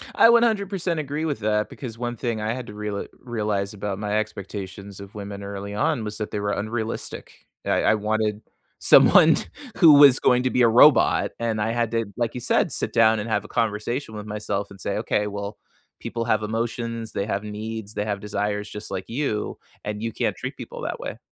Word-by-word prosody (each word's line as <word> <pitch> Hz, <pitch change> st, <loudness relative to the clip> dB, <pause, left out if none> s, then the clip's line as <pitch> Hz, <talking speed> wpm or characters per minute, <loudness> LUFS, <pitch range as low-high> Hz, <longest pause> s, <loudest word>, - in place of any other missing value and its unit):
I -, -, +7 dB
100% 200 Hz, -7 st, +2 dB
agree 150 Hz, +2 st, -3 dB
with 145 Hz, -8 st, -2 dB
that 105 Hz, 0 st, 0 dB
because 115 Hz, -4 st, -8 dB
one 120 Hz, 0 st, -3 dB
thing 115 Hz, -3 st, -2 dB
I 110 Hz, +1 st, -1 dB
had 125 Hz, -1 st, -6 dB
to 105 Hz, -, -9 dB
reala 105 Hz, -1 st, -4 dB
realize 105 Hz, -4 st, -2 dB
about 100 Hz, -1 st, -4 dB
my 105 Hz, 0 st, -1 dB
expectations 100 Hz, -1 st, -6 dB
of 100 Hz, +1 st, -11 dB
women 100 Hz, -1 st, -7 dB
early 100 Hz, 0 st, -6 dB
on 115 Hz, +4 st, 0 dB
was 105 Hz, 0 st, -5 dB
that 105 Hz, -, -4 dB
they 105 Hz, -, -2 dB
were 100 Hz, 0 st, -1 dB
unrealistic. 110 Hz, +2 st, -4 dB, 0.2 s
I -, -, +1 dB
I 110 Hz, -, +4 dB
wanted 105 Hz, 0 st, -1 dB, 0.4 s
someone -, -, +7 dB, 0.4 s
who 165 Hz, -5 st, +8 dB
was 140 Hz, -2 st, +8 dB
going 125 Hz, 0 st, +3 dB
to 130 Hz, -, +2 dB
be 125 Hz, -, +1 dB
a -, -, +7 dB
robot, 125 Hz, +4 st, +5 dB
and 110 Hz, -2 st, -1 dB
I 110 Hz, +2 st, 0 dB
had 115 Hz, -1 st, 0 dB
to, 115 Hz, -1 st, 0 dB
like 120 Hz, -2 st, -1 dB
you 125 Hz, -, -5 dB
said, -, -, +2 dB
sit -, -, -2 dB
down 110 Hz, -2 st, +4 dB
and 105 Hz, -, -4 dB
have 105 Hz, -2 st, 0 dB
a -, -, -8 dB
conversation 115 Hz, +2 st, -2 dB
with 105 Hz, -1 st, -6 dB
myself 105 Hz, -1 st, -3 dB
and 95 Hz, -, -12 dB
say, -, -, -2 dB
"Okay, 105 Hz, 0 st, 0 dB
well, 100 Hz, 0 st, -5 dB, 0.4 s
people 115 Hz, -1 st, -4 dB
have 110 Hz, -2 st, +1 dB
emotions, 115 Hz, 0 st, -3 dB
they 100 Hz, -, -2 dB
have 100 Hz, -1 st, -2 dB
needs, 105 Hz, 0 st, -6 dB
they 105 Hz, -1 st, -2 dB
have 105 Hz, -2 st, -2 dB
desires 105 Hz, 0 st, -3 dB
just 105 Hz, -1 st, -7 dB
like 95 Hz, -1 st, -4 dB
you, 115 Hz, -4 st, -2 dB, 0.3 s
and 105 Hz, 0 st, -4 dB
you 115 Hz, 0 st, -2 dB
can't -, -, -1 dB
treat -, -, -6 dB
people -, -, -8 dB
that -, -, -4 dB
way." -, -, -6 dB
110 Hz, 210 wpm, -24 LUFS, 105-120 Hz, 0.4 s, who